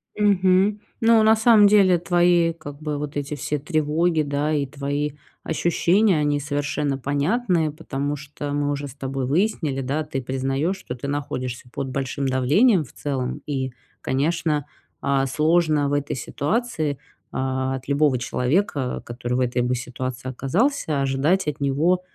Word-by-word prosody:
Мгм. 200 0 +3 0.2
Ну, 225 -1 +5
на 220 +1 +6
самом 220 -2 +6
деле 195 -4 +5
твои 175 -1 +3
как 145 -2 -10
бы 150 -1 -2
вот 145 0 -5
эти 145 +1 -3
все 145 +2 -2
тревоги, 155 +2 +1
да, 145 +1 -1
и 145 -2 +1
твои 145 +1 -3 0.3
ощущения, 175 +3 +2
они 145 -1 +1
совершенно 145 -1 -1
понятные, 155 - 0
потому 145 -2 -3
что 145 0 -7
мы 145 0 0
уже 145 0 -3
с 135 - -11
тобой 135 -2 -3
выяснили, 155 -4 0
да, 140 +4 -1
ты 140 -3 -4
признаешь, 135 +8 -1
что 125 -9 -7
ты 130 +2 -6
находишься 130 -3 -4
под 135 - -4
большим 135 +1 -3
давлением 155 - +3
в 130 - -15
целом. 130 -3 -3
И, 135 -3 -2 0.3
конечно, 150 +1 0 0.4
а, 140 -1 +1
сложно 155 0 +2
в 145 - -1
этой 145 0 -1
ситуации, 155 - -2 0.3
а, 130 0 -1
от 130 0 -8
любого 140 -2 +2
человека, 130 +3 -1
который 120 +1 -4
в - - 0
этой 125 -1 +1
бы 125 +1 0
ситуации 125 +1 -5
оказался, 155 - 0
ожидать 140 +7 +1
от 150 0 -2
него, 155 +7 +2
145 Hz, 155 wpm, -23 LUFS, 135-170 Hz, 0.4 s, на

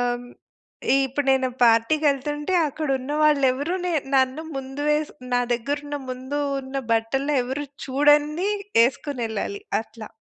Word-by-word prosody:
హ్మ్, 245 0 -8 0.8
ఇప్పుడు 275 +2 -3
నేను 260 -1 +2 0.2
పార్టీకెళ్తుంటే 295 +6 +2
అక్కడ 305 +2 -4
ఉన్న 260 +3 -5
వాళ్ళు 300 -2 +4
ఎవరు 290 +8 -2
నే 360 - 0 0.2
నన్ను 260 +3 +2
ముందు 270 +2 -5
వేసి 300 0 0 0.2
నా 245 - +3
దగ్గర 240 +5 -2
ఉన్న 290 0 -3
ముందు 260 +3 -4 0.2
ఉన్న 265 +1 -7 0.2
బట్టలని 270 +6 0
ఎవరు 265 +4 -3 0.2
చూడంది 295 +6 +3 0.4
ఏసుకొనెళ్ళాలి, 255 - -3 0.2
అట్లా. 220 -1 -10
275 Hz, 130 wpm, -24 LUFS, 255-295 Hz, 0.8 s, వాళ్ళు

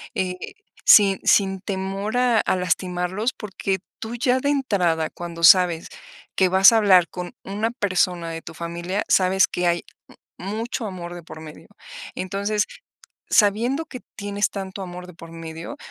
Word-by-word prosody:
eh, 185 -1 -1 0.5
sin 195 -3 +7
sin 195 -2 +3
temor 195 +3 -3
a 245 -3 +3
a - - +1
lastimarlos, 180 +4 -1
porque 195 -2 -3 0.2
tú 225 +1 -6
ya 250 +2 +1
de 280 - -1
entrada, 180 - +1
cuando 170 -1 -8
sabes 175 -1 +6 0.5
que 190 -1 +3
vas 190 +4 +7
a - - +5
hablar 190 -5 +5
con 180 -1 -7
una 210 +3 -2
persona 185 -6 0
de 165 0 -6
tu - - -9
familia, 170 +4 -3
sabes 190 0 +4
que 180 0 -1
hay 175 0 +1 0.6
m 185 - -6
mucho 230 +2 -3
amor 175 -2 -7
de 175 - -9
por 155 0 -11
medio, 155 0 -12 0.5
entonces, 200 +3 -1 0.7
sabiendo 235 +9 +2
que 255 -5 -9 0.2
tienes 205 0 -1
tanto 195 0 -6
amor 180 -1 -8
de 180 - -12
por 165 0 -12
medio, 165 - -8
190 Hz, 160 wpm, -23 LUFS, 175-210 Hz, 0.7 s, sin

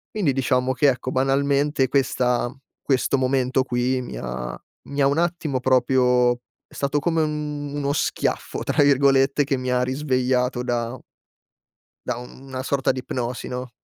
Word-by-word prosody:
Quindi 180 -10 +1
diciamo 130 0 +1
che, 145 +3 +3
ecco, 130 0 -2
banalmente, 140 +1 +2
questa 125 -3 +1 0.3
questo 135 0 +1
momento 130 0 +1
qui 125 +1 0
mi 95 - -7
ha - - -5 0.3
mi 140 0 -2
ha 135 - +5
un 140 +3 +1
attimo 170 -6 -1
proprio 125 -1 +3 0.4
è - - -22
stato 140 +1 -1
come 165 +2 +1
un 150 -2 -3
"uno 140 -1 -1
schiaffo", 145 - -1
tra 150 - +1
virgolette, 140 0 +4
che 140 0 0
mi 130 -1 -3
ha 125 0 +2
risvegliato 130 -2 0
da 120 0 -2 1.1
da - - -1
un 125 +2 -11
una 130 0 -4
sorta 135 -1 +1
di 130 - -4
ipnosi, 125 -1 -4
no? 125 0 -5
130 Hz, 155 wpm, -23 LUFS, 125-140 Hz, 1.1 s, ha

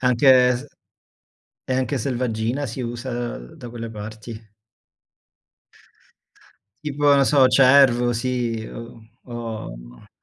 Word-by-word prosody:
Anche 125 +1 +4 0.3
s 130 +4 -9 1.0
e 130 - -2
anche 130 +1 -1
selvaggina 120 +1 -2
si 120 +2 -6
usa 120 0 -4
da 60 - -11
quelle 115 -1 -7
parti? 110 0 -9 2.3
Tipo, 145 0 -3
non 140 -1 +4
so, 140 -3 +5
cervo, 125 -2 +5
sì 120 -2 -2
o 115 0 -10 0.2
o 110 - -8
120 Hz, 100 wpm, -22 LUFS, 115-130 Hz, 2.3 s, so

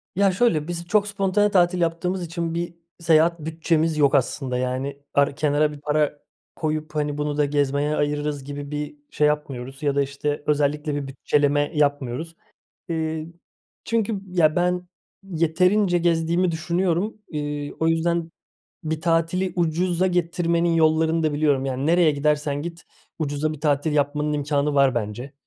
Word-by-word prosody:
Ya 200 +1 +4
şöyle, 180 -7 +1
biz 170 0 -5
çok 210 +2 +2
spontane 200 +1 +1
tatil 180 -1 +3
yaptığımız 175 +2 -1
için 165 0 -3
bir 170 0 -3 0.2
seyahat 170 0 +3
bütçemiz 160 0 0
yok 145 -1 +4
aslında. 130 -1 0
Yani 130 +3 -2
par 140 0 +2
kenara 150 0 +2
bir 145 - -10
para 150 0 0 0.4
koyup, 155 -1 -3
hani, 150 -1 -1
"Bunu 150 0 -2
da 150 - +3
gezmeye 145 +1 0
ayırırız." 145 -1 -1
gibi 145 +1 -7
bir 150 - -4 0.2
şey 150 - +2
yapmıyoruz 135 -2 -3
ya 140 -1 +1
da, 140 - +3
işte, 140 +1 -3
özellikle 150 0 0
bir 145 -1 -3
bütçeleme 145 +2 +1
yapmıyoruz. 145 +2 -1 0.5
Eee, 160 -1 -2 0.6
çünkü 225 -3 0
ya, 170 -4 +2
ben 180 0 0 0.4
yeterince 180 +2 +2
gezdiğimi 170 +1 +1
düşünüyorum, 175 +5 -1
iii, 145 -1 -4
o 160 - +2
yüzden 165 0 +1 0.6
bir 160 0 -2
tatili 165 +3 +1
ucuza 175 +2 +1
getirmenin 170 -1 +1
yollarını 160 0 +3
da 155 -1 +1
biliyorum. 145 -3 +1
Yani 135 +1 -2
nereye 170 0 +4
gidersen 145 0 0
git, 170 +1 -7 0.3
ucuza 155 0 -1
bir 155 - -9
tatil 150 0 +1
yapmanın 150 +1 0
imkânı 145 0 0
var 135 -2 +4
bence. 120 +4 -4
155 Hz, 150 wpm, -23 LUFS, 145-170 Hz, 0.6 s, Ya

